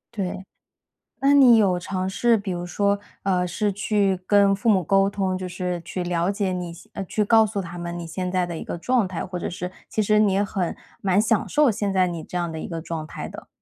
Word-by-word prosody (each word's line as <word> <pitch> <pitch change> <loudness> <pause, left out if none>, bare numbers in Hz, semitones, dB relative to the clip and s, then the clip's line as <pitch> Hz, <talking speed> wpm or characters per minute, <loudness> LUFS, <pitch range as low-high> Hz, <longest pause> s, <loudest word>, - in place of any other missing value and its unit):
对， 190 -1 -3 0.8
那 280 +1 +4
你 250 -5 +7
有 190 -4 +3
尝 185 +1 -3
试， 230 +4 +2
比 200 -1 -5
如 175 -1 -3
说 200 +3 +1 0.3
呃， 180 -2 +1
是 205 +4 -1
去 200 -1 +1
跟 200 -1 +4
父 230 +3 +2
母 190 -3 +3
沟 195 +3 +3
通， 190 -2 -1
就 185 0 -4
是 180 -1 -3
去 180 +2 -4
了 175 +1 0
解 200 -2 -1
你 175 -2 -4 0.2
呃， 195 - -4
去 210 +3 -1
告 220 +1 +5
诉 210 -1 -2
他 175 -2 -7
们 175 0 -5
你 170 - -6
现 180 +2 -4
在 185 -1 +1
的 170 -2 -5
一 - - -6
个 170 - -5
状 245 +1 +1
态。 180 -2 -6
或 180 -1 -5
者 - - -4
是 180 +1 -5 0.2
其 215 - 0
实 210 +1 +3
你 210 -2 +4
也 195 +1 +2
很 190 -3 -2 0.3
蛮 190 0 +3
享 220 -1 +1
受 295 -3 +4
现 205 -1 -1
在 185 -1 +3
你 170 -3 -5
这 180 - -4
样 175 -1 -2
的 160 - -5
一 - - -5
个 165 -2 -5
状 160 -1 -5
态 - - -7
的。 - - -10
190 Hz, 260 characters per minute, -24 LUFS, 175-205 Hz, 0.8 s, 你